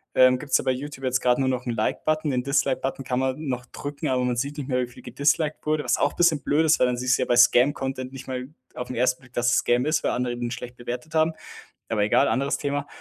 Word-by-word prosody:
Ähm, 130 0 +5
gibt's 140 -1 +2
ja - - -4
bei - - +1
Youtube 135 +1 -6
jetzt 130 0 +1
grad 125 -1 +3
nur 135 - 0
noch 125 -1 -1
'n - - 0
Like-Button. 155 +7 -1
Den 125 -1 -1
Dislike-Button 135 0 -1
kann 125 0 -1
man 130 +4 -2
noch 125 -1 -3
drücken, 145 +2 -5
aber 130 -2 +1
man 125 -1 0
sieht 140 +5 -3
nicht 140 -3 -5
mehr, 125 -2 0
wie 125 - -2
viel 120 - -15
gedisliked 150 +2 0
wurde. 155 0 0
Was 125 -1 +1
auch - - +1
bisschen 165 -4 +3
blöd 150 +4 +2
ist, 160 - +4
weil 125 - +4
dann 125 -1 -1
siehst 125 +1 +2
du - - -2
ja - - 0
bei 120 - +3
Scam-Content 130 +1 +3
nicht 135 -1 -10
mal 130 -1 -4 0.3
auf 125 0 -6
'n 125 - -5
1. 125 +2 +1
Blick, 125 -1 -20
dass 120 0 +1
es - - +3
Scam 120 +1 +1
ist, 155 0 +1
weil - - +1
andere 125 0 -1
ihn 120 0 -3
schlecht 125 -1 -7
bewertet 125 +5 -7
haben, 160 0 +2 0.6
aber 110 -2 +1
egal, 110 +6 +3
anderes 140 +1 0
Thema. 145 0 -2
130 Hz, 270 wpm, -24 LUFS, 125-145 Hz, 0.6 s, Ähm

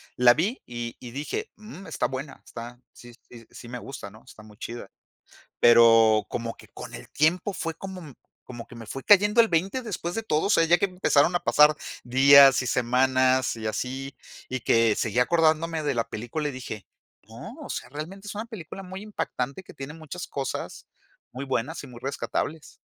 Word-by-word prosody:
la 125 -1 +6
vi, 195 - -1
y 120 -1 -6
y 120 - -9
dije: 150 - -4
"Mm, 210 -3 -11
está - - -1
buena, 130 +2 -7
está 120 +1 -9
sí 120 0 -14 0.2
sí 115 -1 -13
sí 120 - -12
me 125 +1 -6
gusta, 125 -5 -8
¿no? 110 +2 -17
Está 110 - -14
muy 105 -1 -16
chida". 120 +2 -7 0.7
Pero 115 -2 +6
como 115 -1 -4
que - - -16
con - - -10
el - - -10
tiempo 175 +7 +1
fue 165 -3 -4
como 180 -5 -9 0.3
como 120 -2 -9
que - - -14
me 115 -1 -10
fue 135 +5 -6
cayendo 210 +3 +6
el 225 - +5
20 190 +8 0
después 180 -6 -4
de 225 - -2
todo, 155 -7 0
o - - 0
sea, 165 - +5
ya 170 +2 +5
que - - +1
empezaron 180 -3 +2
a 175 - +2
pasar 150 +6 +5 0.3
días 135 +1 +7
y 130 - -3
semanas 130 +1 +2
y 110 -1 -6
así, 130 +4 -4 0.4
y 130 0 -2
que 115 -1 +3
seguí 115 0 -1
acordándome 160 +3 +2
de 145 -2 0
la 115 -1 -1
película 120 +8 -4
y - - -5
dije: 115 -5 -7 0.4
"No, - - -10
o - - -8
sea, - - -5
realmente 180 +8 -7
es - - -6
una 215 +2 -5
película 195 -5 -9
muy 190 +1 -8
impactante 160 -7 -4
que - - -14
tiene 135 +2 -7
muchas 165 +2 -8
cosas 135 -2 -5 0.5
muy 130 +2 -5
buenas 135 +4 -2
y - - -9
muy 120 -2 -12
rescatables". 145 +3 -4
135 Hz, 195 wpm, -26 LUFS, 120-170 Hz, 0.7 s, días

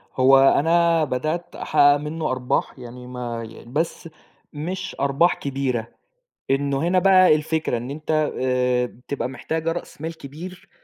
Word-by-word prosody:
هو 135 +1 +6 0.2
أنا 165 +1 +3
بدأت 155 +5 -3
أحقَّق 145 0 +4
منه 155 0 -3
أرباح، 130 +1 -2
يعني 125 0 -10
ما 120 -2 -5
يع 115 - -13
بس 160 +5 -3 0.4
مش 180 +6 -5
أرباح 140 +5 +3
كبيرة، 130 -4 -2 0.6
إنه 140 +1 0
هنا 185 +1 +3
بقى 185 -3 +6
الفكرة 155 -3 -1
إن 120 +2 -6
أنت 155 +1 -1
آآ 125 -1 +1
بتبقى 125 +2 -5
محتاجة 160 +5 -3
رأس 170 -3 -7
مال 160 +1 -5
كبير، 175 +7 -10
145 Hz, 140 wpm, -22 LUFS, 125-165 Hz, 0.6 s, هو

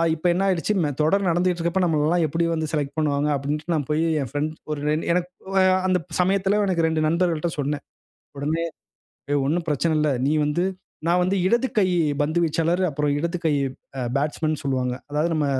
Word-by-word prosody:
இப்ப 165 +3 -1
என்ன 185 +3 0
ஆகிருச்சு. 190 +2 +1
மே 150 - +1
தொடர் 195 +5 +2
நடந்துட்டு 175 +2 +2
இருக்கிறப்ப 170 +2 0
நம்மள 155 -3 +1
எல்லாம் 170 +1 +2
எப்பிடி 165 +3 0
வந்து 160 -1 -1
செலக்ட் 145 -3 -2
பண்ணுவாங்க 145 -1 +1
அப்பிடின்டு 150 +4 -3
நான் 145 -4 -2
போய் 155 +2 +2 0.2
என் 135 - -4
ஃபிரெண்ட் 150 +2 -2 0.2
ஒரு 150 -1 -3 0.3
எனக்கு 180 0 0 0.3
அ - - +5 0.2
அந்த 185 -1 +2 0.2
சமயத்தில 195 +2 +2
எனக்கு 175 -3 +1
2 160 -1 +1
நண்பர்கள்ட்ட 170 0 +1
சொன்னேன். 145 0 -2 0.5
உடனே 155 +4 -1 0.7
ஏ - - +3
ஒன்னும் 165 +4 0
பிரச்சனை 150 +2 +1
இல்ல. 150 0 +2 0.2
நீ 145 - +2
வந்து 150 +4 0 0.4
நான் 175 +2 +3
வந்து 185 +2 +1
இடது 235 +6 +3
கை 195 - +4 0.4
பந்து 155 +3 0
வீச்சாளர், 165 +3 +1
அப்புறம் 150 0 0
இடது 170 +3 -2
கை 160 - +3 0.5
அ - - -1 0.2
பேட்ஸ்மேன்னு 155 +1 -1
சொல்லுவாங்க. 130 -2 0 0.2
அதாவது 150 +3 +1
நம்ம 155 -2 +1
160 Hz, 185 wpm, -23 LUFS, 150-175 Hz, 0.7 s, அ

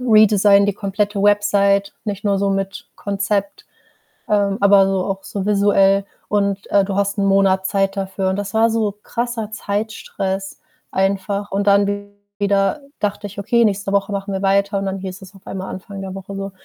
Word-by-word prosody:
redesign 210 -4 +5
die 205 - +1
komplette 200 0 -2
Website, 200 -1 +3
nicht 205 -1 -4
nur 200 -1 +2
so 200 0 +1
mit 195 -1 -3
Konzept, 200 0 -2 0.6
ähm, 200 -1 +2
aber 200 -1 +6
so 190 -1 0
auch 195 -1 -3
so 195 -2 -4
visuell 200 -1 +3 0.2
und, 200 -1 0
äh, 200 -1 +5
du 195 0 -3
hast 200 +1 0
1 200 - +1
Monat 195 -1 +3
Zeit 195 0 0
dafür.“ 190 0 -2
Und 190 - 0
das 200 0 -4
war 225 +1 +4
so 220 -2 0
krasser 235 -2 -3
Zeitstress 200 -2 -4 0.3
einfach. 195 +1 -1
Und 200 +1 -1
dann 205 0 +2 0.3
wieder 200 +7 +1 0.2
dachte 205 0 -2
ich: 200 +1 -9
„Okay, 235 +4 +2
nächste 200 -1 -1
Woche 200 +1 +1
machen 200 0 -3
wir 190 - -2
weiter“, 200 +1 +2
und 195 - -3
dann 190 0 -2
hieß 190 0 -7
es 190 +1 -13
auf 195 - -18
einmal 190 0 -5
Anfang 195 +1 -8
der 190 -1 -6
Woche 195 +1 -8
so: 195 0 -5
200 Hz, 185 wpm, -19 LUFS, 195-205 Hz, 0.6 s, aber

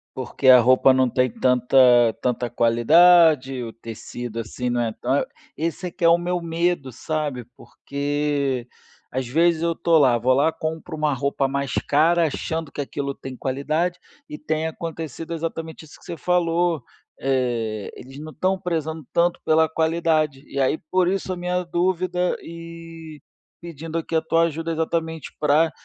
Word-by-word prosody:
Porque 130 +1 -3
a 125 -1 +9
roupa 130 +2 +5
não 130 -1 +2
tem 125 +1 +1
tanta 125 +2 +1 0.4
tanta 125 -1 -1
qualidade, 135 +3 +4
o 115 -2 -6
tecido 115 +1 -7
assim 125 +2 -4
não 120 0 0
é 115 -2 -1
ta 130 +5 -1 0.3
esse 165 +3 -3
é - - -7
que 170 - -2
é - - +7
o 170 - +6
meu 175 +1 -2
medo 170 -3 -1
sabe, 145 0 -3
porque 140 -2 -2 0.5
às 130 -1 -3
vezes 165 +5 +2
eu 170 0 +1
estou 165 0 +2
lá, 130 -4 +4
vou 125 +3 +2
lá, 145 +5 +2
compro 160 +1 -5
uma 150 -1 0
roupa 140 0 -1
mais 140 0 -2
cara 165 +3 +2
achando 160 +1 -4
que - - -10
aquilo 140 0 -3
tem 135 -1 -9
qualidade, 155 +8 -2 0.3
e 300 - -6
tem 160 - -2
acontecido 165 0 -6
exatamente 165 0 -5
isso 155 - -15
que - - -20
você - - -5
falou, 170 -2 +1 0.4
eh, 120 -6 -1
eles 135 +2 -12
não 155 +2 -8
estão 185 +5 0
prezando 160 -4 -3
tanto 175 0 +1
pela 160 0 +4
qualidade. 160 -3 0
E 140 - -2
aí 135 +4 +2
por 185 -1 +2
isso 190 -1 -2
a - - -6
minha 180 +1 -1
dúvida 180 +1 0
e 165 -2 -10 0.4
pedindo 165 -1 -6
aqui 165 0 -3
a 160 - +3
tua 165 +1 +2
ajuda 165 0 -2
exatamente 160 0 -3
para 150 +2 +3
155 Hz, 165 wpm, -23 LUFS, 130-165 Hz, 0.5 s, a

